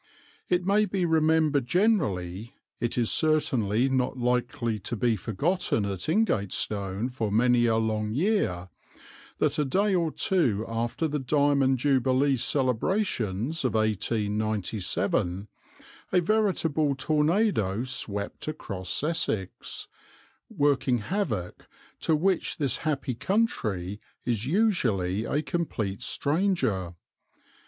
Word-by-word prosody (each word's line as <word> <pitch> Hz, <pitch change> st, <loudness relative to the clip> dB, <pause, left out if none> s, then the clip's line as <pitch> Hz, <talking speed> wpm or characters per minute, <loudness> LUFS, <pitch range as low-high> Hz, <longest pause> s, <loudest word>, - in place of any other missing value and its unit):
It 180 Hz, 0 st, +1 dB
may 205 Hz, +2 st, +3 dB
be 195 Hz, -3 st, -1 dB
remembered 155 Hz, -4 st, +2 dB
generally, 115 Hz, -, 0 dB, 0.2 s
it 120 Hz, +1 st, -2 dB
is 120 Hz, -2 st, +1 dB
certainly 130 Hz, -7 st, +2 dB
not 130 Hz, -1 st, 0 dB
likely 120 Hz, -2 st, -1 dB
to 120 Hz, -, -4 dB
be 115 Hz, +1 st, +1 dB
forgotten 115 Hz, -, 0 dB
at 100 Hz, -, -4 dB
Ingatestone 105 Hz, -, 0 dB
for 110 Hz, -5 st, -2 dB
many 120 Hz, +2 st, +3 dB
a 110 Hz, -1 st, +2 dB
long 110 Hz, -1 st, -1 dB
year, 130 Hz, -, 0 dB, 0.7 s
that -, -, +1 dB
a -, -, +3 dB
day 195 Hz, +9 st, +1 dB
or 170 Hz, -3 st, +2 dB
two 125 Hz, -, +1 dB
after 115 Hz, +7 st, -1 dB
the 150 Hz, 0 st, -2 dB
Diamond 140 Hz, 0 st, +2 dB
Jubilee 135 Hz, +1 st, +2 dB
celebrations 130 Hz, -, 0 dB
of 130 Hz, -3 st, 0 dB
1897 105 Hz, -3 st, -1 dB, 0.6 s
a 185 Hz, -, +4 dB
veritable 165 Hz, -7 st, +1 dB
tornado 150 Hz, -, +1 dB
swept 105 Hz, -5 st, -5 dB
across 100 Hz, -, -4 dB
Essex, 150 Hz, -, -2 dB, 0.6 s
working 140 Hz, -3 st, +2 dB
havoc 120 Hz, -, -3 dB, 0.3 s
to 160 Hz, -, +2 dB
which 180 Hz, +3 st, +1 dB
this 140 Hz, -6 st, +1 dB
happy 145 Hz, -4 st, -2 dB
country 110 Hz, -, -1 dB, 0.2 s
is 120 Hz, -1 st, -1 dB
usually 115 Hz, -, +1 dB
a 150 Hz, +2 st, -1 dB
complete 120 Hz, -, -3 dB
stranger. 135 Hz, -, 0 dB
130 Hz, 110 wpm, -27 LUFS, 105-160 Hz, 0.7 s, a